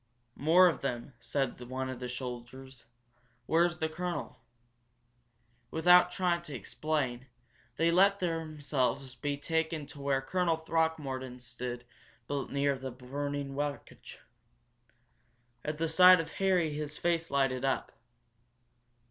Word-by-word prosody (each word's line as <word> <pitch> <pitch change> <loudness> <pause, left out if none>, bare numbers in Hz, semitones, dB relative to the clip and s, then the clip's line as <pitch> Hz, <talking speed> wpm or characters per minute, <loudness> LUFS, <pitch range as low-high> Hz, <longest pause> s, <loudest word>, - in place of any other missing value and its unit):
"More 170 +5 +6
of 165 -6 0
them," 130 0 -4
said 135 +2 -2
one 130 +2 -4
of 130 -1 -5
the 125 -1 -5
soldiers. 125 0 -7 0.6
"Where's 170 +2 +2
the 160 -1 0
colonel?" 160 -5 -4 1.3
Without 180 +3 +6
trying 180 -2 +1
to 150 -5 -8
explain, 130 +1 -2 0.5
they 165 +1 +2
let 195 +3 +5
themselves 145 -7 -2
be 145 0 -3
taken 160 0 -1
to 140 0 -11
where 140 -1 +1
Colonel 165 +4 0
Throckmorton 150 -6 -2
stood 120 0 -6 0.4
near 140 -1 -1
the 130 0 -5
burning 140 +2 -4
wreckage. 145 0 -5 1.5
At 150 0 -3
the 165 +1 0
sight 180 +2 +8
of 165 - -4
Harry 180 -5 +1
his 150 0 -4
face 170 -1 0
lighted 135 -2 +1
up. 135 0 0
145 Hz, 120 wpm, -31 LUFS, 130-165 Hz, 1.5 s, sight